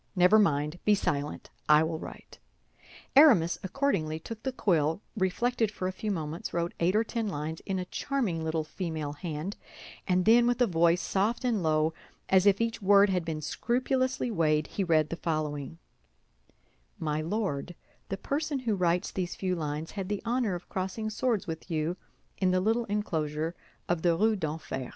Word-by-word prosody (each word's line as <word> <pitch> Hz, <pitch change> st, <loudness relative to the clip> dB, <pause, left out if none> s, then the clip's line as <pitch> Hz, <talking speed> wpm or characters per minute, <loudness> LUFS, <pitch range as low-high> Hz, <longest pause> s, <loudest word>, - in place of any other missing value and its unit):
Never 180 Hz, +4 st, +6 dB
mind! 150 Hz, -3 st, +1 dB
Be 210 Hz, -, +4 dB
silent, 145 Hz, -6 st, -3 dB, 0.2 s
I 150 Hz, +1 st, +7 dB
will 160 Hz, 0 st, -2 dB
write." -, -, -10 dB, 0.8 s
Aramis 235 Hz, -, +6 dB
accordingly 190 Hz, -, -1 dB
took 220 Hz, +7 st, -8 dB
the 265 Hz, -, -2 dB
quill, 165 Hz, -, +1 dB, 0.2 s
reflected 225 Hz, +4 st, +1 dB
for 190 Hz, -3 st, -4 dB
a -, -, -1 dB
few 210 Hz, +3 st, -5 dB
moments, 165 Hz, -3 st, -4 dB
wrote 170 Hz, 0 st, -1 dB
eight 175 Hz, +4 st, +2 dB
or 220 Hz, -, +4 dB
ten 230 Hz, -1 st, -3 dB
lines 160 Hz, -3 st, -4 dB
in 195 Hz, -, -1 dB
a 180 Hz, -, -3 dB
charming 205 Hz, -8 st, -2 dB
little 160 Hz, 0 st, -1 dB
female 155 Hz, -3 st, -4 dB
hand, 160 Hz, +4 st, -5 dB, 0.5 s
and 180 Hz, 0 st, +2 dB
then 235 Hz, +2 st, +6 dB
with 245 Hz, 0 st, +1 dB
a 245 Hz, -, +5 dB
voice 170 Hz, -2 st, +3 dB
soft 220 Hz, +6 st, 0 dB
and 235 Hz, -4 st, +1 dB
slow, 155 Hz, -1 st, +1 dB, 0.4 s
as 190 Hz, +1 st, +5 dB
if 200 Hz, -1 st, +5 dB
each 230 Hz, 0 st, -1 dB
word 200 Hz, 0 st, +5 dB
had 180 Hz, -2 st, 0 dB
been 160 Hz, -2 st, -4 dB
scrupulously 255 Hz, -, 0 dB
weighed, 155 Hz, -5 st, +2 dB
he 200 Hz, -, -3 dB
read 155 Hz, -4 st, +2 dB
the -, -, -1 dB
following: 155 Hz, -2 st, -3 dB, 1.2 s
"My 155 Hz, -4 st, -1 dB
Lord, 175 Hz, -3 st, -2 dB, 0.3 s
The 195 Hz, -, -2 dB
person 295 Hz, +5 st, -2 dB
who 240 Hz, -4 st, -1 dB
writes 180 Hz, -2 st, +1 dB
these 180 Hz, -2 st, -3 dB
few 185 Hz, -1 st, -1 dB
lines 155 Hz, -1 st, -4 dB
had 195 Hz, -2 st, -5 dB
the 205 Hz, -1 st, -2 dB
honor 235 Hz, -5 st, 0 dB
of 175 Hz, -, -8 dB
crossing 195 Hz, +4 st, -3 dB
swords 230 Hz, -2 st, 0 dB
with 165 Hz, 0 st, -6 dB
you 160 Hz, +1 st, -1 dB, 0.4 s
in 185 Hz, -, +3 dB
the 185 Hz, 0 st, +3 dB
little 225 Hz, +5 st, +1 dB
enclosure 165 Hz, -6 st, -2 dB, 0.3 s
of 175 Hz, -2 st, 0 dB
the 170 Hz, -1 st, +3 dB
Rue 220 Hz, +3 st, +3 dB
d'Enfer. 155 Hz, -7 st, -4 dB
180 Hz, 175 wpm, -29 LUFS, 160-215 Hz, 1.2 s, I